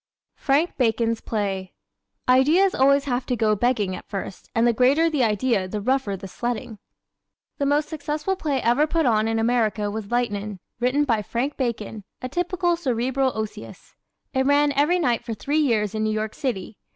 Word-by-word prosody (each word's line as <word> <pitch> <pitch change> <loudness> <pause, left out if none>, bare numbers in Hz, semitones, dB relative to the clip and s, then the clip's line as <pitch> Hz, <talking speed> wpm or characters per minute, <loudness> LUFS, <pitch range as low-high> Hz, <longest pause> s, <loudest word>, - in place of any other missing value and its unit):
Frank 295 +5 +1
Bacon's 230 -2 +1
Play 195 -4 -3 0.5
¶ 250 - +6
Ideas 325 +9 +4
always 275 +1 +4
have 255 -2 -2
to 250 - 0
go 215 -2 +2
begging 210 -4 0
at - - -11
first, 195 -2 -6
and 230 +1 +3
the 240 - +4
greater 280 +8 +3
the 290 -5 +1
idea 215 -2 +1
the 210 +3 -4
rougher 235 -3 0
the 195 - -8
sledding. 230 +1 -4 0.8
The 280 - +1
most 295 +1 +2
successful 305 +4 -2
play 295 -7 -1
ever 255 +6 +3
put 325 0 +1
on 220 -3 +3
in 225 0 0
America 225 -3 +1
was 215 -1 -5
"Lightnin'," 210 -5 -2 0.2
written 255 +4 +2
by 230 -6 +1
Frank 245 +7 -2
Bacon, 225 -4 -3 0.2
a 255 - -4
typical 350 +4 0
Cerebral 260 -3 0
Osseous. 215 -1 -7 0.4
It 265 0 +1
ran 290 +1 +4
every 290 +6 +2
night 245 -9 +1
for 225 - -4
three 290 +8 -1
years 220 -8 +1
in 215 0 -1
New 215 - +1
York 215 0 -2
City. 225 -7 -4
245 Hz, 180 wpm, -23 LUFS, 215-285 Hz, 0.8 s, ¶